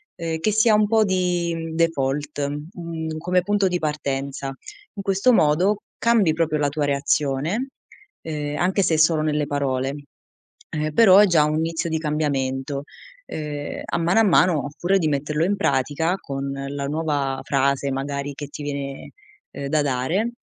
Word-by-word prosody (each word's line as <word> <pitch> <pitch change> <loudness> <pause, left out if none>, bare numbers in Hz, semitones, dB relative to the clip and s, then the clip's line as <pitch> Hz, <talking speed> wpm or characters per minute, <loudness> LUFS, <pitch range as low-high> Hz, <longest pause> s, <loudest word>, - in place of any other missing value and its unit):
ehm, 165 -2 -3
che 215 +7 +1
sia 220 +1 +4
un 210 0 +4
po' 220 +1 +4
di 175 -4 -1
default, 145 -3 0 0.3
mhmm, 160 -2 -5
come 180 +3 +1
punto 205 0 +2
di 180 -1 0
partenza. 140 -3 -3 0.4
In 200 - -6
questo 195 +6 +3
modo 185 +4 +3 0.2
cambi 225 -8 +3
proprio 160 -1 0
la 145 -1 +2
tua 145 +1 -1
reazione, 145 - 0 0.5
ehm, 150 -2 -4
anche 190 +2 +1
se 160 -3 +2
solo 155 0 +4
nelle 150 -1 0
parole. 135 -2 -1 0.8
Ehm, 155 0 -2
però 195 0 +7
è 210 - +7
già 165 -5 +4
un 150 +1 0
inizio 165 +1 -1
di 160 0 -1
cambiamento. 140 -3 -2 0.4
Ehm, 150 -2 -5
a - - -2
mano 170 +6 +3
a - - +6
mano 180 -6 +3
oppure 170 +7 0
di 160 - +1
metterlo 150 +2 0
in 200 +3 +1
pratica 150 0 0
con 140 0 -4
la 140 +1 -4
nuova 145 -3 -1
frase 140 0 +1
magari 140 +1 -3
che 145 +1 -7
ti 145 +1 -8
viene, 140 -1 -5 0.4
ehm, 140 - -5
da 155 +1 +2
dare, 145 - 0
155 Hz, 160 wpm, -23 LUFS, 140-175 Hz, 0.8 s, però